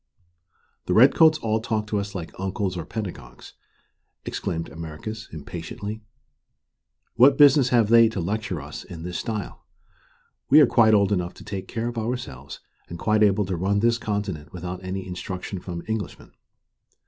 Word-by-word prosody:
"The 90 Hz, -, +1 dB
Redcoats 155 Hz, +6 st, +6 dB
all 110 Hz, -5 st, 0 dB
talk 110 Hz, -1 st, -2 dB
to 105 Hz, -1 st, -1 dB
us 100 Hz, 0 st, -6 dB
like 85 Hz, -3 st, -6 dB
uncles 95 Hz, 0 st, -2 dB
or 85 Hz, -3 st, -5 dB
pedagogues," 105 Hz, -5 st, -7 dB, 0.7 s
exclaimed 80 Hz, 0 st, -3 dB
Americus, 85 Hz, +8 st, -7 dB
impatiently. 90 Hz, +7 st, -7 dB, 1.2 s
"What 130 Hz, +4 st, +6 dB
business 140 Hz, -3 st, +6 dB
have 115 Hz, -4 st, +3 dB
they 115 Hz, -1 st, +7 dB
to 105 Hz, -, -4 dB
lecture 95 Hz, 0 st, -2 dB
us 75 Hz, +1 st, -8 dB
in 80 Hz, -2 st, -9 dB
this 90 Hz, -1 st, -4 dB
style? 105 Hz, -4 st, -5 dB, 0.9 s
We 145 Hz, -, +8 dB
are 150 Hz, -, +8 dB
quite 110 Hz, -3 st, +5 dB
old 100 Hz, -1 st, +3 dB
enough 90 Hz, -2 st, -1 dB
to -, -, -12 dB
take 95 Hz, -2 st, -6 dB
care 115 Hz, +1 st, -3 dB
of 120 Hz, -1 st, -3 dB
ourselves, 110 Hz, -, -5 dB, 0.3 s
and 85 Hz, -, -6 dB
quite 110 Hz, +4 st, +1 dB
able 105 Hz, -1 st, +3 dB
to 95 Hz, 0 st, -2 dB
run 100 Hz, +4 st, 0 dB
this 115 Hz, 0 st, +2 dB
continent 100 Hz, -9 st, -4 dB
without 90 Hz, +1 st, -6 dB
any 95 Hz, +1 st, -4 dB
instruction 90 Hz, +1 st, -5 dB
from 85 Hz, -1 st, -7 dB
Englishmen. 110 Hz, -4 st, -5 dB
100 Hz, 160 wpm, -24 LUFS, 90-110 Hz, 1.2 s, We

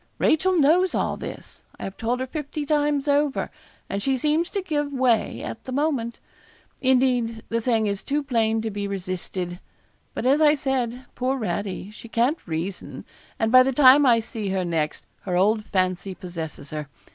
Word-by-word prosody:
Rachel 370 Hz, +4 st, +3 dB
knows 340 Hz, +5 st, +4 dB
all -, -, 0 dB
this. -, -, -9 dB, 0.2 s
I -, -, -7 dB
have 195 Hz, -, -5 dB
told 245 Hz, +3 st, -1 dB
her -, -, 0 dB
fifty 300 Hz, +1 st, -5 dB
times 295 Hz, -1 st, +1 dB
over, 285 Hz, -1 st, +1 dB, 0.4 s
and 200 Hz, -, -3 dB
she 265 Hz, +3 st, +1 dB
seems 305 Hz, +6 st, +1 dB
to 395 Hz, -2 st, -3 dB
give 295 Hz, -4 st, -1 dB
way 255 Hz, -4 st, +1 dB
at 225 Hz, -, -6 dB
the 260 Hz, -, -6 dB
moment. 265 Hz, -4 st, -1 dB, 0.6 s
Indeed 250 Hz, -4 st, +2 dB
the 230 Hz, 0 st, 0 dB
thing 225 Hz, -2 st, +1 dB
is 200 Hz, -1 st, -1 dB
too 290 Hz, +1 st, -1 dB
plain 225 Hz, -4 st, +1 dB
to 220 Hz, -, -2 dB
be 205 Hz, 0 st, -3 dB
resisted. 185 Hz, -2 st, -4 dB, 0.6 s
But -, -, -3 dB
as 280 Hz, +4 st, +4 dB
I 300 Hz, -1 st, +6 dB
said, 260 Hz, -3 st, -2 dB
poor 260 Hz, +2 st, -1 dB
Radie, 200 Hz, 0 st, -3 dB
she 230 Hz, -, -11 dB
can't 240 Hz, +8 st, +1 dB
reason; 175 Hz, +4 st, -5 dB, 0.3 s
and 225 Hz, 0 st, 0 dB
by 255 Hz, 0 st, +9 dB
the 265 Hz, +1 st, +2 dB
time 275 Hz, +1 st, +7 dB
I 230 Hz, -2 st, +5 dB
see 220 Hz, -2 st, -4 dB
her 190 Hz, -1 st, 0 dB
next, 160 Hz, -3 st, -2 dB, 0.2 s
her 180 Hz, -2 st, -1 dB
old 210 Hz, +3 st, +2 dB
fancy 185 Hz, -1 st, -1 dB
possesses 160 Hz, -6 st, -7 dB
her. 150 Hz, -1 st, -4 dB
235 Hz, 180 wpm, -24 LUFS, 200-280 Hz, 0.6 s, by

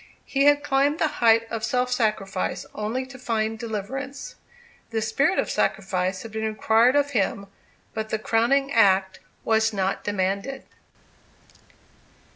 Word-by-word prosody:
He 275 Hz, 0 st, +1 dB
had 290 Hz, 0 st, +5 dB
climbed 285 Hz, +2 st, +2 dB
the 320 Hz, -, +2 dB
height 230 Hz, -1 st, +5 dB
of 225 Hz, -1 st, -3 dB
self 250 Hz, +2 st, 0 dB
sacrifice 215 Hz, -6 st, -1 dB
only 225 Hz, +5 st, -3 dB
to 260 Hz, 0 st, -12 dB
find 225 Hz, -2 st, -2 dB
deliverance. 250 Hz, +5 st, -5 dB, 0.6 s
The 225 Hz, -, -1 dB
spirit 275 Hz, -, +1 dB
of -, -, 0 dB
sacrifice 185 Hz, -1 st, -1 dB
had 225 Hz, -, -9 dB
been 220 Hz, +1 st, -4 dB
required 225 Hz, +4 st, +3 dB
of 285 Hz, 0 st, +2 dB
him, 200 Hz, -3 st, 0 dB, 0.5 s
but 220 Hz, 0 st, -4 dB
the 220 Hz, -, 0 dB
crowning 240 Hz, +6 st, +1 dB
act 190 Hz, -5 st, +3 dB, 0.2 s
was 220 Hz, 0 st, +2 dB
not 195 Hz, -1 st, -1 dB
demanded. 200 Hz, +6 st, -2 dB
225 Hz, 135 wpm, -24 LUFS, 210-260 Hz, 0.6 s, had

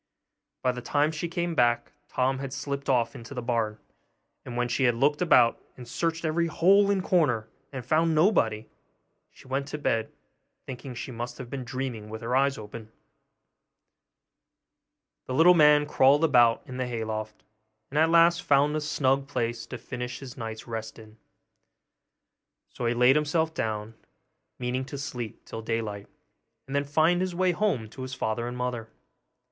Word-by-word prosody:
By 125 Hz, -, +3 dB
the 125 Hz, 0 st, -7 dB
time 145 Hz, +5 st, +1 dB
she 160 Hz, +2 st, -4 dB
came 170 Hz, 0 st, -2 dB
back, 120 Hz, -5 st, +2 dB, 0.2 s
Tom 130 Hz, +1 st, 0 dB
had 135 Hz, -1 st, -5 dB
slipped 140 Hz, 0 st, -4 dB
off 125 Hz, -3 st, +2 dB
into 120 Hz, +4 st, -10 dB
the 125 Hz, -, -3 dB
barn; 115 Hz, -3 st, -1 dB, 0.7 s
and 120 Hz, -, -7 dB
when 120 Hz, 0 st, +1 dB
she 125 Hz, +2 st, +1 dB
had 120 Hz, -1 st, +3 dB
looked 145 Hz, +6 st, +1 dB
about 125 Hz, -9 st, +4 dB, 0.2 s
and 125 Hz, -2 st, -10 dB
searched 165 Hz, +6 st, -2 dB
every 170 Hz, +2 st, +1 dB
hole 195 Hz, +5 st, +4 dB
and 195 Hz, -2 st, +1 dB
corner, 125 Hz, -13 st, +2 dB, 0.2 s
and 130 Hz, -4 st, -6 dB
found 160 Hz, +4 st, +2 dB
nobody, 115 Hz, -, +2 dB, 0.6 s
she -, -, -18 dB
went 135 Hz, +1 st, -2 dB
to 150 Hz, -, -5 dB
bed, 115 Hz, -6 st, -1 dB, 0.5 s
thinking 130 Hz, 0 st, -8 dB
she 130 Hz, -, -6 dB
must 120 Hz, +1 st, -6 dB
have 125 Hz, -3 st, -9 dB
been 135 Hz, -2 st, -4 dB
dreaming 125 Hz, -4 st, -5 dB
with 110 Hz, +1 st, -7 dB
her 120 Hz, +2 st, -1 dB
eyes 135 Hz, +1 st, +2 dB
open. 110 Hz, +1 st, -9 dB, 2.4 s
The 130 Hz, -, -3 dB
little 170 Hz, +5 st, +7 dB
man 150 Hz, -3 st, +6 dB
crawled 145 Hz, +1 st, +4 dB
about 120 Hz, -7 st, +4 dB
in 130 Hz, -, -8 dB
the 130 Hz, -1 st, -2 dB
hay 115 Hz, -2 st, -3 dB
loft, 110 Hz, -1 st, -5 dB, 0.5 s
and 150 Hz, -, 0 dB
at 160 Hz, +1 st, +4 dB
last 170 Hz, +1 st, +5 dB
found 145 Hz, -1 st, +3 dB
a 155 Hz, -, -1 dB
snug 140 Hz, -2 st, +1 dB
place 120 Hz, -4 st, -3 dB
to 130 Hz, -, -6 dB
finish 125 Hz, +1 st, -6 dB
his 135 Hz, -2 st, -9 dB
night's 110 Hz, -2 st, -6 dB
rest 110 Hz, -1 st, -6 dB
in; 110 Hz, -1 st, -14 dB, 1.5 s
so 120 Hz, -, -4 dB
he 120 Hz, -, +1 dB
laid 125 Hz, +3 st, +5 dB
himself 160 Hz, +2 st, +1 dB
down, 110 Hz, -4 st, -3 dB, 0.6 s
meaning 125 Hz, +1 st, -2 dB
to 140 Hz, +1 st, -7 dB
sleep 125 Hz, -5 st, -6 dB
till 115 Hz, -, -7 dB
daylight, 110 Hz, -3 st, -3 dB, 0.6 s
and 135 Hz, -, -6 dB
then 140 Hz, 0 st, +1 dB
find 160 Hz, +5 st, +2 dB
his 185 Hz, -2 st, -2 dB
way 185 Hz, 0 st, +2 dB
home 175 Hz, -, 0 dB
to 130 Hz, -, -10 dB
his 130 Hz, 0 st, -5 dB
father 115 Hz, +1 st, -2 dB
and 120 Hz, 0 st, -5 dB
mother. 125 Hz, -3 st, -3 dB
130 Hz, 175 wpm, -27 LUFS, 115-150 Hz, 2.4 s, little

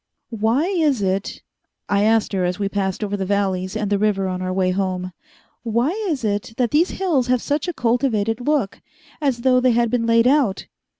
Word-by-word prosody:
"Why 225 Hz, +6 st, +1 dB
is 315 Hz, -, +1 dB
it," 195 Hz, +1 st, -2 dB, 0.4 s
I 200 Hz, 0 st, +1 dB
asked 220 Hz, 0 st, +2 dB
her 190 Hz, -2 st, 0 dB
as 180 Hz, +1 st, -1 dB
we 200 Hz, -1 st, -1 dB
passed 195 Hz, 0 st, -2 dB
over 205 Hz, -1 st, -2 dB
the 195 Hz, -, -3 dB
valleys 190 Hz, 0 st, -1 dB
and 210 Hz, -2 st, -3 dB
the 200 Hz, -, +2 dB
river 200 Hz, -2 st, +1 dB
on 185 Hz, 0 st, -3 dB
our 185 Hz, 0 st, -2 dB
way 185 Hz, 0 st, +1 dB
home, 185 Hz, -1 st, -2 dB, 0.5 s
"why 235 Hz, +5 st, 0 dB, 0.2 s
is 280 Hz, -7 st, -2 dB
it 205 Hz, +1 st, -2 dB
that 245 Hz, -3 st, +1 dB
these 325 Hz, +5 st, +3 dB
hills 315 Hz, -10 st, +1 dB
have 250 Hz, 0 st, +2 dB
such 290 Hz, +6 st, -2 dB
a -, -, 0 dB
cultivated 230 Hz, -3 st, 0 dB
look 275 Hz, -6 st, -1 dB, 0.4 s
as 265 Hz, -5 st, 0 dB
though 255 Hz, 0 st, +4 dB
they 250 Hz, -1 st, +3 dB
had 235 Hz, -1 st, +1 dB
been 230 Hz, -2 st, 0 dB
laid 230 Hz, 0 st, +4 dB
out?" 255 Hz, -7 st, +2 dB
220 Hz, 200 wpm, -21 LUFS, 195-255 Hz, 0.5 s, though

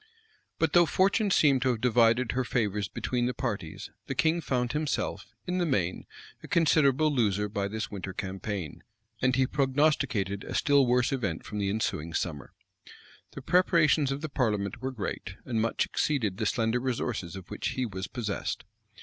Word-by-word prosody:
But 160 Hz, -3 st, +1 dB
though 175 Hz, -1 st, +6 dB
fortune 200 Hz, +4 st, +2 dB
seemed 140 Hz, -8 st, +4 dB
to 130 Hz, -, +2 dB
have 120 Hz, -3 st, 0 dB
divided 120 Hz, 0 st, +3 dB
her 130 Hz, +1 st, 0 dB
favors 105 Hz, -5 st, -1 dB
between 120 Hz, +7 st, -1 dB
the 125 Hz, -, -2 dB
parties, 100 Hz, -, -4 dB, 0.2 s
the -, -, -3 dB
king 165 Hz, +2 st, +2 dB
found 125 Hz, -4 st, -1 dB
himself, 150 Hz, 0 st, -2 dB
in 180 Hz, 0 st, -1 dB
the 175 Hz, -, +2 dB
main, 90 Hz, -, -1 dB, 0.3 s
a -, -, -10 dB
considerable 155 Hz, -2 st, +3 dB
loser 105 Hz, -5 st, +1 dB
by 100 Hz, -1 st, -2 dB
this 110 Hz, +2 st, -4 dB
winter 95 Hz, -1 st, -5 dB
campaign; 95 Hz, -3 st, -5 dB, 0.4 s
and 130 Hz, 0 st, +3 dB
he 130 Hz, 0 st, +3 dB
prognosticated 135 Hz, -8 st, +1 dB
a -, -, -6 dB
still 140 Hz, -4 st, +4 dB
worse 125 Hz, +2 st, +2 dB
event 100 Hz, -12 st, -2 dB
from 105 Hz, -, -5 dB
the 100 Hz, -1 st, 0 dB
ensuing 85 Hz, -6 st, -2 dB
summer. 75 Hz, -6 st, -3 dB, 0.8 s
The 135 Hz, -, -8 dB
preparations 160 Hz, -4 st, +3 dB
of 135 Hz, +1 st, -3 dB
the 155 Hz, -, -4 dB
parliament 105 Hz, -5 st, -1 dB
were 130 Hz, -, -2 dB
great, 100 Hz, -5 st, -5 dB
and 115 Hz, -3 st, -1 dB
much 115 Hz, -, +1 dB
exceeded 115 Hz, -11 st, -1 dB
the 110 Hz, -1 st, 0 dB
slender 115 Hz, +1 st, +1 dB
resources 120 Hz, -7 st, -3 dB
of 95 Hz, 0 st, -10 dB
which 105 Hz, -, -3 dB
he 130 Hz, -, +1 dB
was 95 Hz, -3 st, -5 dB
possessed. 110 Hz, -5 st, -3 dB
120 Hz, 175 wpm, -28 LUFS, 100-140 Hz, 0.8 s, though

